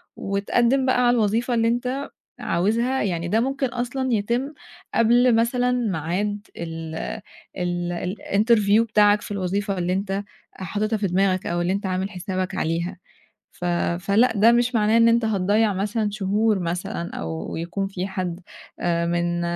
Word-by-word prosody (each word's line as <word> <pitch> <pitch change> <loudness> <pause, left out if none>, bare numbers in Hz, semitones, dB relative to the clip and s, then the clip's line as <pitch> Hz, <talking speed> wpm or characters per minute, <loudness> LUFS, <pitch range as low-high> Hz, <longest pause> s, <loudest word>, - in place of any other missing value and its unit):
وتقدّم 235 +7 +1
بقى 255 -1 +2
على 240 - +4
الوظيفة 225 +3 +1
اللي 230 -1 +2
أنت 250 +4 -1 0.3
عاوزها، 230 +9 0
يعني 170 -4 -2
ده 215 +6 +2
ممكن 270 +2 0
أصلًا 250 +1 -2
يتم 235 +7 -1 0.4
قبل 240 +1 +4
مثلًا 245 +2 +2
ميعاد 205 -1 -2
ال 165 -1 -6 0.6
ال 175 -1 -2
ال 180 +2 -3
الinterview 210 0 +4
بتاعَك 210 -2 +3
في - - -9
الوظيفة 200 +1 -2
اللي 180 0 0
أنت 195 +1 -2 0.3
حاطتها 215 +4 -2
في 200 -2 -1
دماغَك 185 +1 +1
أو 175 0 -1
اللي 180 +2 0
أنت 200 +1 -3
عامل 190 +1 -1
حسابك 185 0 -4
عليها، 170 +3 -2 0.5
ف - - -10 0.4
فلأ 215 +6 +3
ده 225 +3 +6
مش 240 +1 +2
معناه 215 0 +3
إن 230 0 +6
أنت 230 0 +3
هتضيّع 205 +1 +2
مثلًا 205 +2 -1
شهور 210 +1 +1
مثلًا 175 +1 -3
أو 80 - -5
يكون 175 +4 -3
في 190 -1 -4
حَدّ 185 -2 -4 0.4
من 170 0 0
205 Hz, 150 wpm, -23 LUFS, 180-230 Hz, 0.6 s, ده